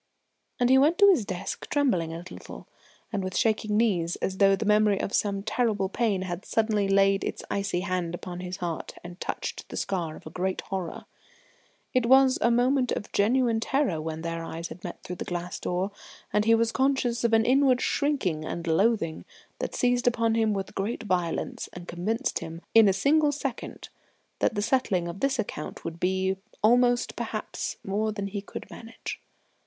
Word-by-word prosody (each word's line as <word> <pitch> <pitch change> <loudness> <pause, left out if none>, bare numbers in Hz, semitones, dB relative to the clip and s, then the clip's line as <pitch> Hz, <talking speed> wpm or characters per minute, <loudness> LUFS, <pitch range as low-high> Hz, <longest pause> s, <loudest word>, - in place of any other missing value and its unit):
And 245 0 +3
he 265 - +7
went 310 +5 +4
to 405 0 +7
his 290 - +2
desk 190 0 -5
trembling 195 - +1
a 165 +1 -6
little, - - -10 0.5
and 200 -2 -1
with 185 0 -3
shaking 215 -2 +1
knees, 180 -7 +2
as 190 - -3
though 195 -1 +6
the 215 - -4
memory 210 -1 +4
of - - -3
some 200 -1 0
terrible 215 -3 0
pain 205 -3 0
had 180 0 -5
suddenly 215 -3 +1
laid 195 0 +3
its - - -4
icy 200 -3 -1
hand 180 -3 -2
upon 175 0 -7
his 180 0 -5
heart 170 -2 -4
and 175 +1 -10
touched - - -4
the - - -6
scar 170 -5 -2
of - - -14
a 155 - -8
great 185 +2 -2
horror. 190 -3 -5 0.9
It 255 -3 +2
was 265 +1 +6
a 235 - +4
moment 250 +2 +2
of 205 - -3
genuine 230 +2 +2
terror 230 - 0
when 160 0 -4
their 165 0 -3
eyes 165 0 -5
had 175 +3 -10
met 175 - -7
through 180 - -6
the - - -4
glass 175 0 -4
door, 185 +3 -1 0.4
and 210 0 +2
he 225 0 +6
was 230 0 +2
conscious 260 -3 +1
of 235 - +2
an 225 0 +4
inward 260 -1 +4
shrinking 235 - 0
and 170 +2 -4
loathing 170 0 +1 0.4
that - - -3
seized 245 0 +2
upon 230 -2 +2
him 225 -1 +2
with 195 -2 -3
great 210 +4 -3
violence 180 -5 -2
and 175 0 -9
convinced 195 +7 -1
him 165 +1 -8
in 225 -3 +7
a - - +5
single 290 +10 +3
second 275 -3 -5 0.5
that 230 - +1
the 205 - 0
settling 215 -7 +1
of 170 +3 -6
this 275 -1 +1
account 200 -9 -5
would 165 0 -5
be 190 +1 +1 0.3
almost, 245 +2 +4
perhaps, - - -4
more 210 +3 0
than 205 -2 -4
he 200 0 -4
could 200 - -8
manage. 225 0 -8
200 Hz, 190 wpm, -27 LUFS, 180-235 Hz, 0.9 s, he